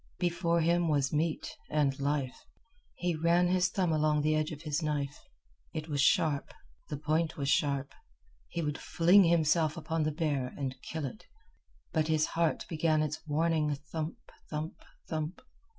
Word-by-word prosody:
Before 170 Hz, -1 st, +1 dB
him 170 Hz, +1 st, +2 dB
was 145 Hz, -3 st, +1 dB
meat 155 Hz, +1 st, -1 dB
and 140 Hz, -3 st, +1 dB
life. 140 Hz, -2 st, -2 dB, 0.5 s
He 175 Hz, 0 st, -1 dB
ran 170 Hz, +2 st, +3 dB
his 185 Hz, +1 st, +3 dB
thumb 180 Hz, -2 st, 0 dB
along 150 Hz, -1 st, +2 dB
the 155 Hz, +1 st, +3 dB
edge 155 Hz, 0 st, +1 dB
of 150 Hz, -1 st, -8 dB
his 150 Hz, 0 st, -1 dB
knife. 145 Hz, -2 st, -2 dB, 0.6 s
It 155 Hz, +1 st, -4 dB
was 145 Hz, -2 st, +1 dB
sharp. 150 Hz, -1 st, +2 dB, 0.4 s
The 150 Hz, -, -3 dB
point 155 Hz, +2 st, 0 dB
was 140 Hz, -1 st, -1 dB
sharp. 140 Hz, -1 st, +1 dB, 0.5 s
He 170 Hz, -, -3 dB
would 150 Hz, -1 st, -2 dB
fling 180 Hz, +4 st, +5 dB
himself 160 Hz, -1 st, +3 dB
upon 165 Hz, 0 st, -2 dB
the 155 Hz, 0 st, +1 dB
bear 145 Hz, -5 st, -1 dB
and 135 Hz, -2 st, -3 dB
kill 160 Hz, -2 st, -4 dB
it. 175 Hz, -, -8 dB, 0.7 s
But 155 Hz, -1 st, +2 dB
his 155 Hz, -1 st, +3 dB
heart 165 Hz, -1 st, +1 dB
began 155 Hz, -1 st, +2 dB
its 155 Hz, +1 st, -3 dB
warning 155 Hz, -1 st, +1 dB
thump, 155 Hz, +3 st, -5 dB, 0.3 s
thump, 155 Hz, +1 st, -5 dB, 0.2 s
thump. 155 Hz, +2 st, -3 dB
155 Hz, 160 wpm, -31 LUFS, 150-165 Hz, 0.7 s, fling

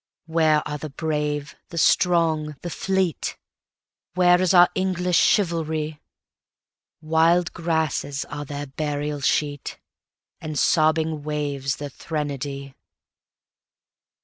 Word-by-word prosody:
Where 160 Hz, -2 st, +2 dB
are 150 Hz, 0 st, -4 dB
the 155 Hz, -, -6 dB
brave, 150 Hz, 0 st, -2 dB
the 170 Hz, -, -8 dB
strong, 160 Hz, -3 st, +2 dB
the 175 Hz, -, -4 dB
fleet? 190 Hz, -2 st, -1 dB, 0.8 s
Where 180 Hz, 0 st, +5 dB
is 185 Hz, -, +3 dB
our 175 Hz, -2 st, +8 dB
English 180 Hz, -2 st, +1 dB
chivalry? 160 Hz, -6 st, +1 dB, 1.0 s
Wild 165 Hz, +2 st, +2 dB
grasses 160 Hz, -4 st, -1 dB
are 145 Hz, 0 st, -6 dB
their 145 Hz, 0 st, -5 dB
burial 145 Hz, +1 st, -3 dB
sheet, 145 Hz, +1 st, -1 dB, 0.6 s
And 155 Hz, -1 st, -5 dB
sobbing 155 Hz, 0 st, +2 dB
waves 145 Hz, -2 st, -2 dB
their 145 Hz, -1 st, -6 dB
threnody. 140 Hz, -2 st, -5 dB
155 Hz, 100 wpm, -23 LUFS, 145-170 Hz, 1.0 s, our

